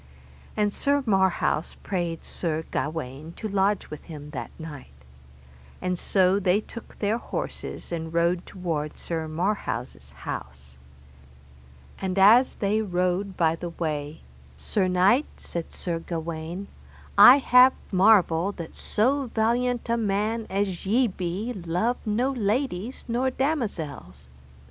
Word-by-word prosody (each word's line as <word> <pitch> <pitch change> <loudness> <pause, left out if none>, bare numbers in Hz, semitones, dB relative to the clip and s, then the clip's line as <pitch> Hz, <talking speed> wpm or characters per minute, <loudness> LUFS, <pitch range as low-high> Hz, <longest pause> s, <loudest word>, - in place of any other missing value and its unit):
And 210 -1 +1
Sir 285 0 +1
Marhaus 190 -6 +1
prayed 175 -4 -2
Sir 160 -2 -2
Gawaine 155 0 -4
to 215 - -5
lodge 200 0 0
with 150 - -8
him 150 -3 -9
that 125 -6 -5
night. 145 - -9 0.8
And 180 - -1
so 185 +2 +2
they 190 0 +3
took 230 +1 -11
their 215 +3 0
horses, - - -6
and 165 -1 -4
rode 170 +1 +1
toward 165 -5 -3
Sir 160 -2 -3
Marhaus' 180 +7 -3
house. 65 0 -8 1.2
And 190 0 -2
as 225 +7 +6
they 210 +2 +1
rode 185 0 -1
by 165 -1 +3
the 175 +1 -5
way, 155 -2 -4 0.4
Sir 190 - 0
knight, 190 +10 +3
said 170 -1 -6
Sir 170 -2 -3
Gawaine, 165 +3 -5 0.5
I 255 - +10
have 255 -1 +6 0.2
marvel 190 -2 +4
that 170 -4 -8
so 265 +5 +1
valiant 240 +2 +1
a 235 0 +1
man 215 +1 -1
as 195 -2 -1
ye 235 +7 +3
be 190 +6 -3
love 185 +6 -1
no 240 +6 +1
ladies 235 -1 -2
nor 245 +3 +1
damosels. 195 - -3
190 Hz, 125 wpm, -26 LUFS, 165-220 Hz, 1.2 s, I